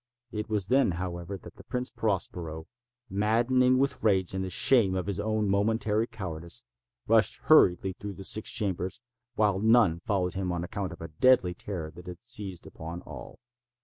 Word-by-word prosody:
It 105 0 -4
was 105 -3 -1
then, 130 -7 +3
however, 85 +2 -5
that - - -14
the - - -13
Prince 125 0 -3
Prospero, 85 -6 -2 0.4
maddening 120 +5 +2
with 135 +1 0
rage 95 -5 +2
and 95 0 -2
the 95 - -4
shame 100 0 +4
of 95 - -2
his 100 -2 -3
own 110 0 0
momentary 105 +2 +1
cowardice, 85 -6 -4 0.4
rushed - - +3
hurriedly 95 +2 +5
through 100 +2 -7
the 95 - -9
six 110 +4 +1
chambers, 95 -7 -1 0.4
while 105 -3 +2
none 110 -6 +4
followed 90 -1 -1
him 95 -1 -2
on 85 -1 -2
account 95 +1 -4
of 85 - -10
a 85 - -5
deadly 90 +2 +3
terror 85 -3 -6
that 90 +3 -13
had 90 +4 -9
seized 105 -7 -3
upon 85 +2 -8
all. - - -10
95 Hz, 175 wpm, -28 LUFS, 90-110 Hz, 0.4 s, hurriedly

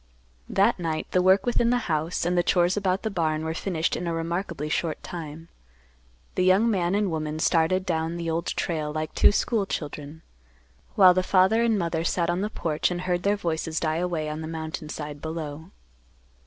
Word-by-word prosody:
That - - +2
night 160 -2 -2
the 185 - +3
work 190 +2 +4
within 235 -1 +2
the 245 - +3
house 160 +1 -1
and 175 +1 +1
the 175 - +4
chores 175 +1 +2
about 195 -2 0
the 220 - -2
barn 160 -4 -1
were 160 - -2
finished 170 -1 -1
in 175 - -4
a 170 - -1
remarkably 170 -1 -3
short 160 +1 -2
time. 165 -1 -7 0.9
The 185 - +1
young 195 +5 +4
man 180 -2 +1
and 205 -3 +1
woman 155 -1 -3
started 170 +3 +2
down 165 -1 -1
the 170 -1 -4
Old 165 +1 -1
Trail 155 -3 -2
like 155 0 -4
two - - +5
school 210 -1 0
children, 150 -1 -6 0.7
while 185 -3 +8
the 185 - +2
father 190 +4 +3
and 230 -2 +2
mother 170 -3 -1
sat 170 0 +1
on 175 +2 -1
the 210 - -1
porch 160 -7 -1
and 175 -1 -3
heard 180 -1 -1
their 200 +2 +1
voices 165 -3 -2
die 155 -1 0
away 170 -3 -1
on 150 +1 -4
the 155 - -5
mountain 160 -1 -5
side 150 -1 -6
below. 160 0 -6
170 Hz, 195 wpm, -26 LUFS, 160-185 Hz, 0.9 s, while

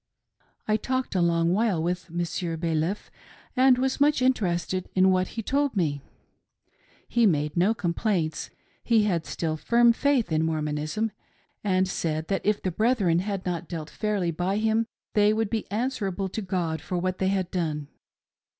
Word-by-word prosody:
I 215 0 +3
talked 260 +3 -2
a 185 - +2
long 170 0 +2
while 210 -4 +2
with 180 +1 -2
Monsieur 170 0 -2
Baliff, 165 +4 -1 0.4
and 255 -1 +5
was 265 +2 -1
much 295 -1 +4
interested 185 -8 0
in 190 0 +5
what 185 0 +2
he 225 - -2
told 280 -1 0
me. 145 -6 0 1.1
He 235 -2 +3
made 150 -4 0
no 190 +6 +3
complaints; 175 -3 -1 0.3
he 225 -3 +3
had 175 -6 0
still 160 -2 -2
firm 235 +8 +4
faith 270 - +1
in 155 0 +2
Mormonism, 155 +7 -1 0.5
and 190 -2 +2
said 160 -3 -2
that 195 - 0
if 210 0 +1
the 185 - 0
brethren 205 -4 +2
had 195 0 -3
not 175 -2 -3
dealt 160 -3 -5
fairly 205 -5 -1
by 180 +5 -1
him 220 +1 +1 0.3
they 210 -1 +4
would 220 -1 -1
be 225 -2 -2
answerable 205 -4 -2
to 220 - -4
God 180 -5 -2
for 180 - -3
what 185 +1 -2
they 190 - +1
had 190 -2 0
done. 155 -5 -2
185 Hz, 165 wpm, -26 LUFS, 170-220 Hz, 1.1 s, and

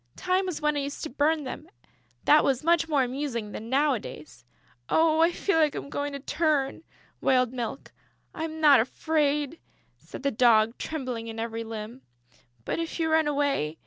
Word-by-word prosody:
"Time 370 +1 0
was 360 - -3
when 300 0 +1
I - - 0
used 280 0 -5
to 315 - -5
burn 300 +3 +1
them; 260 - -7 0.6
that 300 - +6
was 265 -1 +1
much 335 0 +2
more 285 -4 +3
amusing 250 -4 -3
than 225 +2 -7
nowadays." 255 - -1 0.5
"Oh, 320 -1 +3
I 335 +1 +5
feel 350 -1 0
I 310 -1 +4
am 280 - -6
going 285 0 -3
to 280 - -5
turn," 300 -2 0 0.4
wailed 255 -2 +2
Milk. 245 +1 -5 0.4
"I'm 320 0 -5
not 295 -4 +7
afraid," 295 +4 0 0.4
said - - -10
the 280 - +1
Dog, 230 -1 +3
trembling 255 -7 -4
in 225 0 -7
every 230 0 -3
limb, 225 +3 -7 0.6
"but - - -2
if 330 +1 -4
you 320 -1 0
run 315 -1 +3
away.... 280 - 0
280 Hz, 175 wpm, -27 LUFS, 240-315 Hz, 0.6 s, not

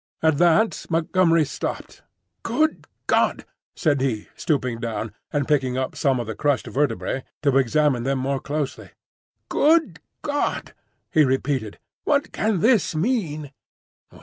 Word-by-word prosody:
At 160 -3 +3
that 175 +6 +3
Montgomery 165 0 +3
stopped. 140 - -5 0.4
"Good 315 0 0 0.2
God!" - - +1 0.3
said 145 -5 +1
he, 115 -6 -2
stooping 125 -6 -1
down, 115 -2 -4 0.2
and 145 -2 -1
picking 130 -4 +1
up 130 0 -2
some 135 -5 +1
of 120 - -3
the 110 - -4
crushed 145 +3 0
vertebrae 135 -1 -1 0.2
to 140 -3 +3
examine 135 0 +2
them 135 +2 0
more 135 +1 -1
closely. 145 0 -4 0.6
"Good 320 +2 +3 0.2
God!" 290 0 -2 0.4
he 155 - +5
repeated, 130 -4 -1 0.3
"what 285 0 +1
can 215 -5 0
this 220 -7 +3
mean?" 155 - -1
145 Hz, 130 wpm, -23 LUFS, 130-170 Hz, 0.6 s, he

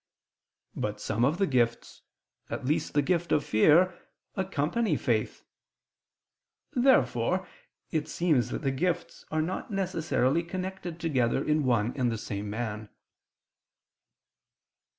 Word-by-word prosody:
But - - -3
some 115 +3 -1
of 145 +7 +2
the 195 - +3
gifts, 120 -7 0 0.5
at - - -4
least 150 +2 0
the 145 - +4
gift 170 +2 0
of 150 - +3
fear, 160 +11 +5 0.4
accompany 190 0 0
faith. 115 -5 -1 1.3
Therefore 260 +2 +3 0.4
it 155 -2 -1
seems 155 -8 +1
that - - -4
the 135 - +1
gifts 175 +6 -2
are 155 0 0
not 185 +8 -4
necessarily 170 - +1
connected 185 -1 -5
together 135 -6 +1
in 150 -1 +2
one 120 -2 +2
and 125 -3 +1
the 115 - -2
same 105 -1 -5
man. 110 -1 -4
150 Hz, 120 wpm, -28 LUFS, 120-180 Hz, 1.3 s, fear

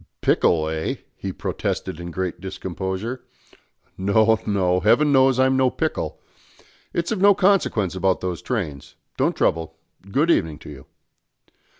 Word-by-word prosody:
"Pickle, 80 -2 +2
eh?" 80 0 -2 0.2
he - - -5
protested 80 - -3
in 85 0 -6
great 90 0 -4
discomposure. 95 +5 -5 0.8
"No, 110 +3 +3
no. 90 -3 +2
Heaven 145 +10 +3
knows 130 -2 +4
I'm 130 0 +3
no 130 -1 +3
pickle. - - -3 0.7
It's 170 0 -2
of 210 -4 -1
no 200 0 +6
consequence 175 - +2
about 95 0 +1
those 90 -2 -4
trains. 85 - -4 0.2
Don't - - +1
trouble. 80 0 0 0.3
Good 150 +11 +2
evening 80 - +1
to 75 - -11
you." 70 -2 -12
95 Hz, 135 wpm, -22 LUFS, 85-130 Hz, 0.8 s, no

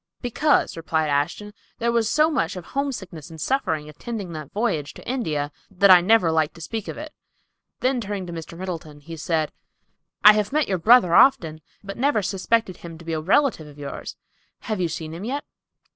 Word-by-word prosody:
"Because," 265 +5 +1
replied 160 -1 -1
Ashton, 170 +9 -1 0.2
"there 235 +1 0
was 230 -2 +1
so 310 +2 +3
much 195 - -1
of 180 -2 -7
homesickness 205 - -4
and 160 -1 -11
suffering 160 - -1
attending 190 +4 -6
that 155 -3 -8
voyage 200 -10 -2
to - - -13
India 155 - -2 0.2
that 195 0 +5
I 180 -1 +9
never 185 -3 +4
like 160 -2 +1
to - - -13
speak 220 +5 -5
of - - -6
it." 300 0 -8 0.7
Then 255 -1 +1
turning 200 -3 -4
to 175 - -7
Mr. 165 0 -8
Middleton, 165 -5 -6
he 165 +3 -9
said, 160 -1 -1 0.7
"I 210 +2 +10
have 210 -1 0
met 300 0 +1
your 190 -2 -1
brother 215 -2 +5
often, 160 - +4 0.2
but 195 0 -7
never 265 -5 +2
suspected 195 +1 0
him 165 -1 -10
to 170 - -14
be 165 - -3
a 155 - -1
relative 195 - +2
of 145 -1 -14
yours. 140 -1 -7 0.5
Have 215 -5 -3
you 175 - +1
seen 160 -1 -6
him 170 +4 -7
yet?" 275 +6 -3
185 Hz, 195 wpm, -23 LUFS, 160-230 Hz, 0.7 s, I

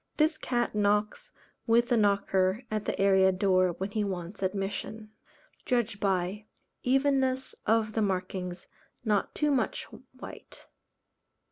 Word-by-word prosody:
This 310 +1 +2
cat 240 -1 -1
knocks 210 - 0 0.4
with 235 +1 +4
the 245 - +4
knocker 200 0 +2
at 215 -1 -2
the - - -2
area 190 -1 +5
door 185 -1 +2
when 190 +4 -4
he 215 0 0
wants 185 -1 -5
admission. 200 +3 -3 0.5
Judged 235 -5 0
by: 195 +2 -1 0.3
Evenness 265 0 +1
of 220 -1 +2
the 220 - 0
markings; 185 -2 -2 0.4
not 210 -2 0
too 300 -1 +1
much 270 - 0 0.4
white. - - -11
210 Hz, 125 wpm, -29 LUFS, 190-235 Hz, 0.5 s, area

